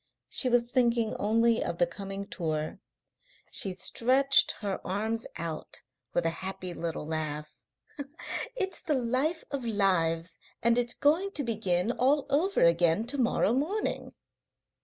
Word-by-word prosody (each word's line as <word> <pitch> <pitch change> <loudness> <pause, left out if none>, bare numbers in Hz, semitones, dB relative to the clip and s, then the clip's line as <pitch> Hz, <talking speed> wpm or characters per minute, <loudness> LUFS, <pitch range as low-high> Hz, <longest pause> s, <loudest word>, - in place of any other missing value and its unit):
She 255 - +4
was 240 0 +2
thinking 235 -3 +1
only 230 +2 +2
of 170 - -3
the 175 - +4
coming 195 +2 -6
tour. 155 -5 -3 0.7
She 195 - +1
stretched 260 +8 +4
her 200 -2 -3
arms 220 +4 -2
out 165 -2 -5 0.3
with 175 - +1
a - - +3
little 165 - -7
happy 190 -1 -4
laugh. 155 -2 -4 1.0
"It's 385 -5 -2
the 315 -5 0
life 260 +7 0
of 280 -3 -3
lives, 180 -6 +1 0.2
and 235 +1 +4
it's 240 -1 +1
going 335 +8 +2
to 290 - 0
begin 215 -4 0
all 270 +3 +2
over 355 +8 +2
again 170 +4 +3
to 275 +3 -1
morrow 235 -2 +2
morning." 325 - -2
225 Hz, 140 wpm, -29 LUFS, 175-260 Hz, 1.0 s, She